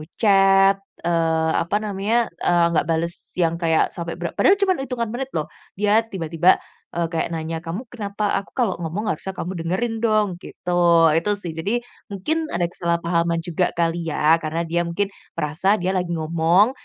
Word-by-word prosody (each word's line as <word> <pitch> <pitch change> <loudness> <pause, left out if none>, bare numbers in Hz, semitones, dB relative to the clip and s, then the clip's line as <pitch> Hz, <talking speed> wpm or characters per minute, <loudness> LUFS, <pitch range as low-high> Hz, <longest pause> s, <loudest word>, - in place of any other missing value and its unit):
chat, 195 -2 +5 0.2
eee, 165 -1 +1
apa 180 +5 -2
namanya, 205 +2 -1 0.2
eee, 175 -1 +3
nggak 165 - +1
bales 165 +1 0 0.2
yang 170 -2 +1
kayak 160 -1 +2
sampai 170 -1 -5
bera 170 0 -4
padahal 390 - +5
cuman 380 -3 +2
hitungan 245 -4 -3
menit 260 +2 -3
loh, 155 -2 0 0.3
dia 210 +2 +3
tiba-tiba, 170 -2 +2 0.4
eee, 170 -1 0
kayak 165 - -1
nanya, 160 0 -3
"Kamu 170 +8 -5
kenapa? 205 -2 -2
Aku 200 - -14
kalau 235 -9 0
ngomong 175 +6 -3
harusnya 190 +4 -5
kamu 175 - -4
dengerin 225 +7 -1
dong." 215 -2 +2
gitu. 170 -3 +3
Itu 165 +6 +1
sih 180 -5 -4
jadi, 200 +10 -2 0.2
mungkin 310 - -2
ada 175 0 0
kesalahpahaman 170 -1 0
juga 175 +1 0
kali 170 0 0
ya, 155 +2 +3
karena 165 +1 -2
dia 170 +1 0
mungkin 195 +4 -1 0.3
merasa 165 +6 +1
dia 185 -1 -1
lagi 180 -2 -1
ngomong, 165 +7 +3
175 Hz, 165 wpm, -22 LUFS, 165-205 Hz, 0.4 s, chat